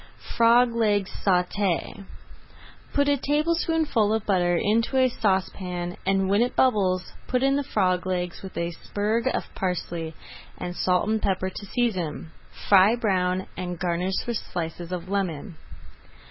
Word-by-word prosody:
FROG 235 Hz, +1 st, +5 dB
LEGS 210 Hz, -4 st, +1 dB
SAUTÉ 190 Hz, +1 st, 0 dB, 0.9 s
Put 285 Hz, 0 st, +2 dB
a 285 Hz, 0 st, +3 dB
tablespoonful 305 Hz, -5 st, +1 dB
of 220 Hz, -, -3 dB
butter 175 Hz, -3 st, +2 dB
into 230 Hz, +7 st, +1 dB
a 260 Hz, 0 st, +5 dB
saucepan, 185 Hz, -4 st, -1 dB
and 195 Hz, 0 st, +2 dB
when 200 Hz, +3 st, +3 dB
it 245 Hz, -, 0 dB
bubbles 190 Hz, -7 st, +2 dB
put 250 Hz, 0 st, 0 dB
in 275 Hz, 0 st, +3 dB
the 285 Hz, -, +1 dB
frog 185 Hz, -6 st, 0 dB
legs 180 Hz, -2 st, -2 dB
with 190 Hz, -, -9 dB
a 170 Hz, 0 st, -1 dB
sprig 210 Hz, +6 st, -1 dB
of -, -, -1 dB
parsley, 170 Hz, -3 st, -3 dB, 0.4 s
and 175 Hz, 0 st, -5 dB
salt 180 Hz, +1 st, +1 dB
and 220 Hz, 0 st, 0 dB
pepper 190 Hz, -1 st, 0 dB
to 200 Hz, -, -8 dB
season. 185 Hz, -10 st, -2 dB, 0.4 s
Fry 200 Hz, +3 st, +6 dB
brown, 185 Hz, -5 st, 0 dB
and 180 Hz, -1 st, -4 dB
garnish 180 Hz, +2 st, -1 dB
with 235 Hz, -2 st, -1 dB
slices 170 Hz, -1 st, -5 dB
of 180 Hz, -1 st, -4 dB
lemon. 185 Hz, -3 st, -3 dB
195 Hz, 145 wpm, -25 LUFS, 180-230 Hz, 0.9 s, Fry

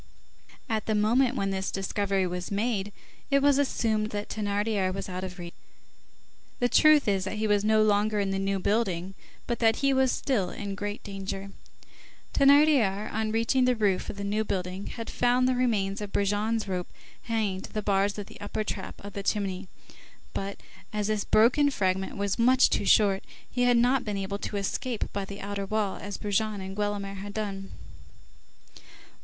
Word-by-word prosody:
At 220 Hz, -4 st, -2 dB
the 220 Hz, -, +1 dB
moment 240 Hz, +5 st, +3 dB
when 195 Hz, -5 st, -1 dB
this 190 Hz, 0 st, -2 dB
discovery 195 Hz, 0 st, -1 dB
was 180 Hz, 0 st, -4 dB
made, 205 Hz, -1 st, -1 dB, 0.4 s
it 275 Hz, -1 st, +4 dB
was 280 Hz, 0 st, +4 dB
assumed 220 Hz, -6 st, 0 dB
that 205 Hz, 0 st, -4 dB
Thénardier 205 Hz, -2 st, 0 dB
was 195 Hz, +1 st, -5 dB
out 185 Hz, 0 st, -5 dB
of 185 Hz, -1 st, -6 dB
reach. 175 Hz, -1 st, -8 dB, 1.1 s
The 245 Hz, -, +3 dB
truth 305 Hz, -1 st, +5 dB
is, 195 Hz, -2 st, +2 dB
that 195 Hz, -, -3 dB
he 215 Hz, -, -1 dB
was 205 Hz, -1 st, +2 dB
no 215 Hz, 0 st, +4 dB
longer 210 Hz, 0 st, +2 dB
in 195 Hz, -1 st, 0 dB
the 195 Hz, -, -1 dB
New 195 Hz, 0 st, 0 dB
Building, 190 Hz, -3 st, 0 dB, 0.3 s
but 235 Hz, -, -2 dB
that 225 Hz, -1 st, +4 dB
he 275 Hz, -1 st, +2 dB
was 265 Hz, -1 st, +3 dB
still 210 Hz, -10 st, 0 dB
in 200 Hz, +1 st, -5 dB
great 205 Hz, +1 st, -5 dB
danger. 195 Hz, 0 st, -6 dB, 0.8 s
Thénardier, 275 Hz, -8 st, +4 dB
on 220 Hz, 0 st, -1 dB
reaching 230 Hz, +3 st, +2 dB
the 250 Hz, 0 st, +3 dB
roof 205 Hz, -4 st, 0 dB
of -, -, -6 dB
the 200 Hz, -, -4 dB
New 210 Hz, +2 st, 0 dB
Building, 185 Hz, -1 st, -3 dB
had 230 Hz, -1 st, -6 dB
found 245 Hz, +1 st, +2 dB
the 255 Hz, -, +3 dB
remains 215 Hz, -5 st, 0 dB
of 205 Hz, -1 st, -5 dB
Brujon's 210 Hz, +2 st, 0 dB
rope 180 Hz, -2 st, -3 dB, 0.4 s
hanging 215 Hz, -5 st, -1 dB
to -, -, -10 dB
the 215 Hz, -, -3 dB
bars 200 Hz, 0 st, +1 dB
of 205 Hz, -, -5 dB
the -, -, -14 dB
upper 205 Hz, +1 st, -3 dB
trap -, -, -5 dB
of 200 Hz, -, -8 dB
the 200 Hz, -, -4 dB
chimney, 195 Hz, -2 st, -2 dB, 0.7 s
but, 195 Hz, 0 st, -4 dB, 0.3 s
as 210 Hz, 0 st, -1 dB
this 215 Hz, -2 st, 0 dB
broken 260 Hz, +6 st, +4 dB
fragment 190 Hz, -6 st, -1 dB
was 200 Hz, +2 st, -1 dB
much 255 Hz, +2 st, +5 dB
too -, -, +1 dB
short, 200 Hz, -3 st, +4 dB, 0.2 s
he 245 Hz, 0 st, 0 dB
had 245 Hz, -1 st, +4 dB
not 250 Hz, +2 st, +3 dB
been 210 Hz, -2 st, -3 dB
able 195 Hz, +1 st, -3 dB
to 205 Hz, -, -4 dB
escape 220 Hz, +4 st, -3 dB
by 200 Hz, -1 st, -2 dB
the 200 Hz, +1 st, -8 dB
outer 200 Hz, 0 st, -4 dB
wall, 215 Hz, -2 st, -1 dB
as 205 Hz, -1 st, -6 dB
Brujon 210 Hz, 0 st, -1 dB
and 190 Hz, 0 st, -6 dB
Guelemer 205 Hz, -1 st, -2 dB
had 200 Hz, +1 st, -8 dB
done. 195 Hz, -3 st, -4 dB
205 Hz, 185 wpm, -27 LUFS, 195-225 Hz, 1.1 s, truth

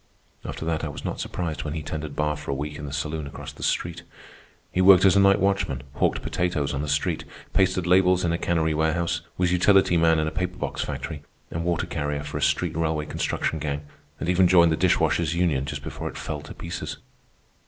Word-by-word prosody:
After -, -, -5 dB
that 80 Hz, -1 st, -1 dB
I -, -, -1 dB
was 75 Hz, -, -7 dB
not -, -, -3 dB
surprised 85 Hz, -4 st, -3 dB
when 75 Hz, 0 st, -4 dB
he 80 Hz, -, -4 dB
tended 75 Hz, -1 st, -5 dB
bar 75 Hz, 0 st, 0 dB
for 75 Hz, 0 st, -9 dB
a 70 Hz, -, 0 dB
week 75 Hz, +2 st, -5 dB
in 75 Hz, -, -6 dB
the -, -, -6 dB
saloon 75 Hz, +1 st, -3 dB
across 70 Hz, -, -8 dB
the -, -, -14 dB
street. 85 Hz, 0 st, -1 dB, 0.7 s
He 90 Hz, -, +1 dB
worked 95 Hz, 0 st, +7 dB
as 95 Hz, -1 st, +6 dB
a -, -, +6 dB
night 100 Hz, 0 st, +5 dB
watchman, 95 Hz, -10 st, 0 dB
hawked -, -, 0 dB
potatoes 85 Hz, -6 st, -1 dB
on 70 Hz, -, -2 dB
the 75 Hz, -, -3 dB
street, 70 Hz, +1 st, 0 dB, 0.3 s
pasted 95 Hz, -2 st, +2 dB
labels 90 Hz, 0 st, +4 dB
in 85 Hz, -, +1 dB
a 85 Hz, -, -1 dB
cannery 80 Hz, -2 st, +1 dB
warehouse, 80 Hz, +2 st, 0 dB, 0.2 s
was 90 Hz, -1 st, +2 dB
utility 90 Hz, 0 st, +4 dB
man 80 Hz, -1 st, +4 dB
in 80 Hz, -, +1 dB
a -, -, -2 dB
paper 90 Hz, +2 st, -3 dB
box -, -, -3 dB
factory, 80 Hz, -3 st, -5 dB, 0.3 s
and 80 Hz, -, -3 dB
water 85 Hz, -1 st, 0 dB
carrier 75 Hz, 0 st, -3 dB
for 75 Hz, -, -4 dB
a -, -, -6 dB
street -, -, +1 dB
railway 80 Hz, -2 st, 0 dB
construction 80 Hz, +1 st, -2 dB
gang, 75 Hz, -1 st, -3 dB, 0.3 s
and -, -, -3 dB
even 90 Hz, +1 st, +4 dB
joined 85 Hz, -2 st, +6 dB
the -, -, +3 dB
Dishwashers' 85 Hz, +1 st, +2 dB
Union 80 Hz, -7 st, +1 dB
just 70 Hz, -, -5 dB
before -, -, -5 dB
it -, -, -9 dB
fell 75 Hz, -1 st, -4 dB
to 75 Hz, -, -10 dB
pieces. -, -, -5 dB
80 Hz, 220 wpm, -25 LUFS, 75-90 Hz, 0.7 s, worked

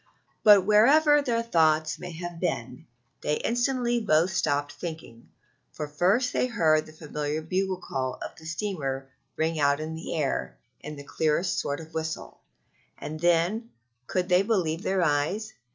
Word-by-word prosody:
But 205 Hz, -3 st, +7 dB
wherever 290 Hz, +9 st, +5 dB
their 235 Hz, -4 st, 0 dB
thoughts 160 Hz, -7 st, +2 dB
may 180 Hz, -1 st, -7 dB
have 175 Hz, 0 st, -7 dB
been, 125 Hz, -8 st, -3 dB, 0.3 s
they 150 Hz, -, 0 dB
instantly 240 Hz, -, 0 dB
both 170 Hz, -1 st, +2 dB
stopped 145 Hz, -4 st, 0 dB
thinking, 145 Hz, -7 st, -8 dB, 0.4 s
for 150 Hz, -, -4 dB
first 190 Hz, -, +1 dB
they -, -, +1 dB
heard 160 Hz, -10 st, +2 dB
the -, -, -12 dB
familiar 150 Hz, -1 st, -4 dB
bugle 185 Hz, +3 st, -1 dB
call 130 Hz, -6 st, -3 dB
of -, -, -7 dB
the 160 Hz, -, -12 dB
steamer 145 Hz, -8 st, -3 dB, 0.2 s
ring 160 Hz, 0 st, -1 dB
out 140 Hz, 0 st, +3 dB
on 155 Hz, +1 st, -4 dB
the 160 Hz, +1 st, -5 dB
air 150 Hz, -4 st, -2 dB, 0.2 s
in 150 Hz, -, -8 dB
the 145 Hz, -, -9 dB
clearest 160 Hz, +4 st, 0 dB
sort 145 Hz, 0 st, -2 dB
of 160 Hz, -1 st, -10 dB
a -, -, -25 dB
whistle; 160 Hz, 0 st, -5 dB, 0.6 s
and 155 Hz, +1 st, -6 dB
then 175 Hz, +7 st, +1 dB, 0.4 s
could 180 Hz, -1 st, -1 dB
they 180 Hz, 0 st, +4 dB
believe 185 Hz, -6 st, 0 dB
their 190 Hz, -2 st, +1 dB
eyes? 170 Hz, +9 st, 0 dB
165 Hz, 160 wpm, -27 LUFS, 150-195 Hz, 0.6 s, But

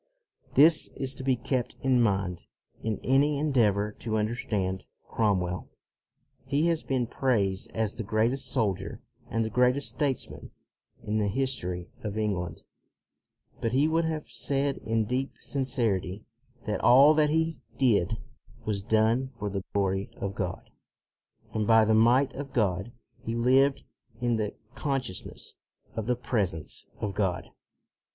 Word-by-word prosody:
This 155 Hz, +2 st, +7 dB
is 135 Hz, 0 st, -1 dB
to 130 Hz, -, -8 dB
be 130 Hz, -1 st, +3 dB
kept 125 Hz, 0 st, -2 dB
in 130 Hz, -2 st, +4 dB
mind 95 Hz, -5 st, 0 dB, 0.3 s
in 110 Hz, -2 st, -1 dB
any 140 Hz, +3 st, +3 dB
en 150 Hz, +1 st, 0 dB
deavor 105 Hz, -4 st, +2 dB
to 110 Hz, -1 st, -1 dB
understand 105 Hz, -4 st, -2 dB, 0.2 s
Cromwell. 90 Hz, -5 st, 0 dB, 0.7 s
He 140 Hz, +4 st, +1 dB
has 165 Hz, -2 st, +1 dB
238 -, -, -19 dB
CROMWELL 130 Hz, -2 st, +1 dB
been -, -, -17 dB, 0.3 s
praised 95 Hz, 0 st, -4 dB
as 110 Hz, -2 st, -1 dB
the 115 Hz, -, -5 dB
greatest 115 Hz, +6 st, +1 dB
soldier 100 Hz, -4 st, -1 dB, 0.3 s
and 115 Hz, 0 st, 0 dB
the 110 Hz, -, -4 dB
greatest 125 Hz, +4 st, +2 dB
statesman 140 Hz, -4 st, -3 dB, 0.5 s
in 110 Hz, +1 st, -1 dB
the 105 Hz, -, +1 dB
history 95 Hz, -7 st, -2 dB
of 105 Hz, -1 st, -4 dB
England, 90 Hz, -6 st, -2 dB, 1.0 s
but 115 Hz, 0 st, -1 dB
he 140 Hz, +4 st, +4 dB
would 165 Hz, +1 st, +2 dB
have 160 Hz, -2 st, -3 dB
said 140 Hz, 0 st, -1 dB
in 110 Hz, 0 st, 0 dB
deep 130 Hz, +4 st, -2 dB
sincerity 110 Hz, -8 st, -1 dB, 0.4 s
that -, -, -2 dB
all 140 Hz, +5 st, +8 dB
that 150 Hz, -1 st, +3 dB
he 160 Hz, -1 st, 0 dB, 0.2 s
did 110 Hz, -5 st, +2 dB, 0.5 s
was 105 Hz, -2 st, -1 dB
done 110 Hz, +4 st, +2 dB
for 105 Hz, -1 st, -3 dB
the 100 Hz, -1 st, -3 dB
glory 95 Hz, -1 st, 0 dB
of 100 Hz, 0 st, -3 dB
God, 90 Hz, -3 st, -4 dB, 0.8 s
and 110 Hz, -1 st, 0 dB
by 115 Hz, -1 st, +6 dB
the 110 Hz, -, +3 dB
might 120 Hz, +5 st, +4 dB
of 140 Hz, 0 st, -7 dB
God. 100 Hz, -1 st, 0 dB, 0.3 s
He 115 Hz, -, -3 dB
lived 130 Hz, +4 st, +3 dB, 0.4 s
in 120 Hz, -2 st, +1 dB
the 105 Hz, -2 st, -2 dB, 0.2 s
consciousness 135 Hz, -10 st, -4 dB, 0.4 s
of 110 Hz, -1 st, -3 dB
the 125 Hz, -, +2 dB
presence 105 Hz, -10 st, -2 dB
of 100 Hz, -2 st, -2 dB
God. 90 Hz, -4 st, -1 dB
115 Hz, 145 wpm, -28 LUFS, 100-135 Hz, 1.0 s, all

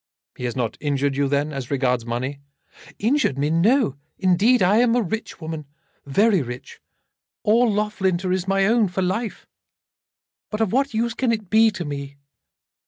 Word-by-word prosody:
"He 125 Hz, -, -5 dB
has 120 Hz, -, -3 dB
not 120 Hz, -4 st, -2 dB
injured 140 Hz, -2 st, 0 dB
you, 140 Hz, 0 st, +1 dB
then, 145 Hz, +2 st, 0 dB
as 135 Hz, -3 st, -5 dB
regards 125 Hz, -4 st, 0 dB
money." 130 Hz, +4 st, -3 dB, 0.6 s
"Injured 230 Hz, -, +1 dB
me! 145 Hz, +2 st, 0 dB
No, 190 Hz, -, +2 dB, 0.2 s
indeed. 195 Hz, +5 st, +3 dB
I 195 Hz, +4 st, +4 dB
am 240 Hz, 0 st, +4 dB
a 245 Hz, -, +3 dB
rich 220 Hz, +4 st, -5 dB
woman, 160 Hz, -3 st, -6 dB, 0.4 s
very 200 Hz, +5 st, +3 dB
rich. 125 Hz, -1 st, -8 dB, 0.6 s
All 230 Hz, +2 st, +4 dB
Loughlinter 190 Hz, -3 st, 0 dB
is 185 Hz, 0 st, -2 dB
my 195 Hz, 0 st, +2 dB
own, 225 Hz, 0 st, +3 dB
for 185 Hz, +1 st, -2 dB
life. 215 Hz, +5 st, -3 dB, 1.0 s
But 210 Hz, -, -4 dB
of 220 Hz, -3 st, 0 dB
what 275 Hz, -1 st, +1 dB
use 230 Hz, +1 st, 0 dB
can 255 Hz, -3 st, 0 dB
it 215 Hz, -5 st, -3 dB
be 220 Hz, +1 st, +6 dB
to 185 Hz, -5 st, -5 dB
me?" 140 Hz, -1 st, -6 dB
185 Hz, 170 wpm, -22 LUFS, 140-220 Hz, 1.0 s, be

